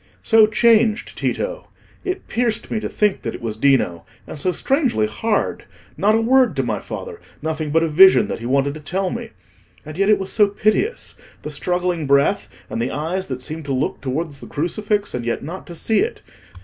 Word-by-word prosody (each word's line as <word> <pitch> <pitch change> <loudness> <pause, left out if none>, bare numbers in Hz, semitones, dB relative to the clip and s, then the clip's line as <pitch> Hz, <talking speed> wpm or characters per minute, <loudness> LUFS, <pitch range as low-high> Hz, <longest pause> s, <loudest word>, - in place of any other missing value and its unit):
"So 220 -2 +6
changed, 225 0 +3
Tito! - - -3 0.4
It 370 0 -4
pierced 230 -1 -1
me 220 - 0
to - - -4
think 210 -2 +1
that - - -4
it - - -9
was 110 -2 -2
Dino. 115 -9 +2 0.2
And - - -8
so 185 - 0
strangely 255 - +1
hard: 210 - -1 0.3
not 215 +2 +3
a 225 - +2
word 250 - +3
to 135 - 0
my 110 -4 -2
father; - - -8 0.2
nothing 155 -1 -2
but 165 +2 +2
a - - +1
vision 190 +5 +6
that - - -4
he 115 - -5
wanted 140 +2 +1
to 155 - -8
tell 185 +5 -2
me. 235 -1 -5 0.6
And 155 0 -8
yet 195 +1 +3
it 210 - +6
was 190 0 -4
so 210 -2 +4
piteous—the 215 - -2
struggling 175 +1 -1
breath, 140 0 +2 0.2
and 115 - -4
the 120 - -1
eyes 170 +7 -3
that 130 -1 -4
seemed 155 +1 -5
to 140 - -2
look 130 - -2
towards 145 +2 -3
the - - -11
crucifix, 205 +6 -1
and 125 - -3
yet 120 0 -2
not 175 +6 -7
to 170 - -9
see 220 +6 +1
it. 455 +4 -2
180 Hz, 200 wpm, -20 LUFS, 140-215 Hz, 0.6 s, So